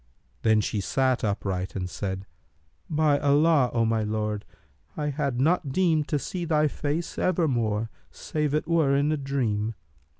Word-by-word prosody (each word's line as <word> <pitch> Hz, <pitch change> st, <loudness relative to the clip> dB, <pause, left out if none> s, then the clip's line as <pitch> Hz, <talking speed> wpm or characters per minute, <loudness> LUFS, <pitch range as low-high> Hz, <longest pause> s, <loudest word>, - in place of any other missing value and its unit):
Then 110 Hz, -1 st, +4 dB
she 105 Hz, 0 st, -2 dB
sat 130 Hz, +5 st, +1 dB
upright 95 Hz, -3 st, -2 dB
and 90 Hz, -2 st, -2 dB
said, 95 Hz, +1 st, -4 dB, 0.6 s
'By 150 Hz, -2 st, +2 dB
Allah, 145 Hz, -1 st, +4 dB
O 115 Hz, -1 st, +1 dB
my 110 Hz, 0 st, +1 dB
lord, 105 Hz, -1 st, -2 dB, 0.5 s
I 150 Hz, -1 st, -1 dB
had 140 Hz, -3 st, -2 dB
not 150 Hz, 0 st, +2 dB
deemed 160 Hz, -2 st, +2 dB
to 150 Hz, -, 0 dB
see 175 Hz, +5 st, -4 dB
thy 155 Hz, -2 st, +2 dB
face 150 Hz, +5 st, -3 dB
ever 180 Hz, -3 st, +2 dB
more, 115 Hz, -4 st, -1 dB, 0.2 s
save 150 Hz, -2 st, -2 dB
it 155 Hz, -, -1 dB
were 160 Hz, -5 st, +3 dB
in 145 Hz, +2 st, +2 dB
a 155 Hz, -, +1 dB
dream!' 115 Hz, -6 st, -1 dB
135 Hz, 160 wpm, -26 LUFS, 110-155 Hz, 0.6 s, Then